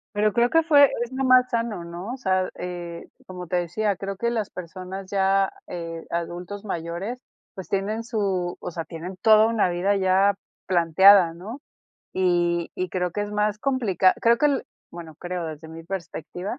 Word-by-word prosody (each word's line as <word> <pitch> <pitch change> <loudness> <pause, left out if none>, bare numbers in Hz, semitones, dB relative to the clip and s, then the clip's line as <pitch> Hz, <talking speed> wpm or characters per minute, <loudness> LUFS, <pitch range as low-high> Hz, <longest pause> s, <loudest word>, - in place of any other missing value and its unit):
Pero 210 +1 +2
creo 235 +4 +2
que 325 +3 +4
fue 290 -3 +7 0.2
es 240 - -8
lo 265 +1 -2
más 255 0 +5
sano, 230 -6 -2
¿no? 175 +7 -6
O - - -3
sea, 185 -7 0
eh, 175 -1 -7 0.2
como 180 -1 -8
te 180 - 0
decía, 190 +4 -1
creo 195 +1 -5
que 235 +4 -1
las 220 -4 -2
personas 185 +2 -8
ya, 195 0 +2 0.2
eh, 165 -1 -6
adultos 175 +4 -5
mayores, 180 +5 -4 0.3
pues, 190 -6 -8
tienen 210 +4 -2
su 195 -6 -1
o - - -5
sea, 165 -1 -5
tienen 175 +2 -8
toda 220 -1 +6
una 225 -4 +2
vida 180 +3 +1
ya 190 +1 +3 0.3
planteada, 180 +1 +6
¿no? 205 +10 -8 0.5
Y 175 -2 +1
y 185 - -3
creo 180 -1 -2
que 205 - -3
es 205 0 -3
más 210 0 0
complicado 215 - +2
creo 235 0 +4
que 295 - +3
el 280 -3 0 0.3
bueno, 165 -2 -10
creo 175 +1 -5
desde 160 0 -8
mi 165 +1 -10
perspectiva, 180 - -6
190 Hz, 180 wpm, -24 LUFS, 175-215 Hz, 0.5 s, fue